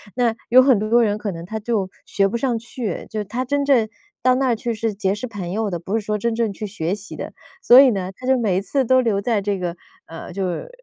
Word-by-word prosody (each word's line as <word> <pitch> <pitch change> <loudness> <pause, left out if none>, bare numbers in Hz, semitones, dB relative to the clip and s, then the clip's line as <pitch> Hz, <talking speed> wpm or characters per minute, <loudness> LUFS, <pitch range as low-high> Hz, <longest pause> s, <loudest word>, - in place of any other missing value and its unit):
那 240 -2 +1
有 255 +2 +8
很 260 -3 +5
多 220 +3 +3
人 210 -2 +1
可 210 -1 -3
能 165 -2 -7
他 220 +5 -5
就 210 -4 -1 0.2
学 195 -1 +1
不 235 +4 -2
上 245 -3 0
去， 230 -4 -5
就 215 -1 -3
他 235 +6 -3
真 285 +2 0
正 240 -6 +3 0.3
到 255 +1 +4
那 265 0 +1
儿 235 - +2
去 235 +1 -3
是 225 0 -2
结 195 -1 -1
识 210 - -5
朋 205 -7 -6
友 210 0 -1
的， 175 - -3
不 195 +6 -2
是 210 - -10
说 210 - -1
真 225 +2 -1
正 225 -3 0
去 210 +2 -6
学 170 -2 -3
习 210 0 -7
的。 - - -7 0.3
所 250 -7 +9
以 275 - +6
呢， 190 -5 -2
他 255 - -8
就 265 0 +4
每 210 -7 +1
一 - - 0
次 260 +7 0
都 260 +2 +4
留 220 -5 +1
在 210 0 0
这 200 0 -1
个， 175 -2 -3 0.3
呃， 165 +2 -9
就 190 +1 -2
是 180 - -4
220 Hz, 290 characters per minute, -21 LUFS, 195-240 Hz, 0.3 s, 所